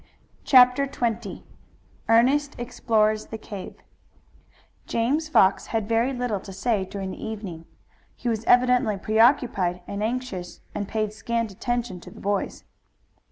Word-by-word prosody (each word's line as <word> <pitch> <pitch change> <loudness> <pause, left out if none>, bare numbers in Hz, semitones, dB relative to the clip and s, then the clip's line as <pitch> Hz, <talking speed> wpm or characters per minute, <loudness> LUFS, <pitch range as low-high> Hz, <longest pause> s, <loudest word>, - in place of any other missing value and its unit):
CHAPTER 255 +1 +6
XX 235 -5 -3 0.7
ERNEST 275 +6 +3
EXPLORES 215 -3 0
THE 225 - -6
CAVE 205 -3 -8 1.1
James 280 +8 0
Fox 195 -10 +4
had 220 -2 -2
very 230 +3 +2
little 245 -5 -2
to 195 - -10
say 200 +1 0
during 190 0 -5
the - - -8
evening. 195 -7 -6 0.5
He - - -6
was 225 -2 0
evidently 250 -3 +4
preoccupied 215 -5 +2
and 200 +1 -5
anxious 220 -6 -4
and 205 -1 -3
paid 215 -1 -2
scant 230 +1 -2
attention 235 -1 -3
to - - -12
the - - -14
boys. 200 0 -2
225 Hz, 130 wpm, -25 LUFS, 200-245 Hz, 1.1 s, CHAPTER